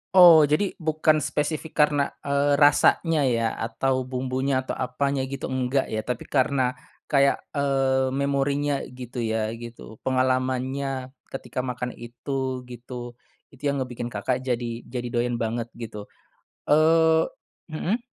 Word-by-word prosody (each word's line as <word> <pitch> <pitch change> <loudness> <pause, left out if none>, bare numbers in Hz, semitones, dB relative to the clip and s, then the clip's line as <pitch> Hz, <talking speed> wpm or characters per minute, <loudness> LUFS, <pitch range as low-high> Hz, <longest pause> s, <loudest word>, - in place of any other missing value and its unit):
Oh 175 -4 +10
jadi 150 +7 +2
bukan 155 -1 +2
spesifik 155 +2 -2
karena, 145 -1 0 0.2
eee, 140 0 +2
rasanya 150 +2 +4
ya 115 -2 +1
atau 130 +4 -1
bumbunya 130 +1 -1
atau - - -3
apanya 135 +2 -1
gitu 135 0 -4
enggak 130 +1 +1
ya, 110 - 0
tapi 125 +2 -4
karena 130 -2 +1 0.3
kayak, 140 -1 +3 0.2
eee, 135 -2 +1
memorinya 140 +1 0
gitu 125 -1 -6
ya 110 -1 -1
gitu 115 -1 -10
pengalamannya 130 +1 -1 0.2
ketika 135 -1 -4
makan 125 -1 -4
itu, 130 +2 -4
gitu. 120 0 -8 0.4
Itu 135 - -18
yang 140 - 0
ngebikin 120 -1 -5
Kakak 120 +4 -2
jadi 120 -2 -2
jadi 125 0 -4
doyan 120 0 0
banget 115 +1 -2
gitu. 110 -3 -7 0.5
Eee 160 +1 +4 0.4
mhm. 180 +8 -2
130 Hz, 130 wpm, -25 LUFS, 125-140 Hz, 0.5 s, Oh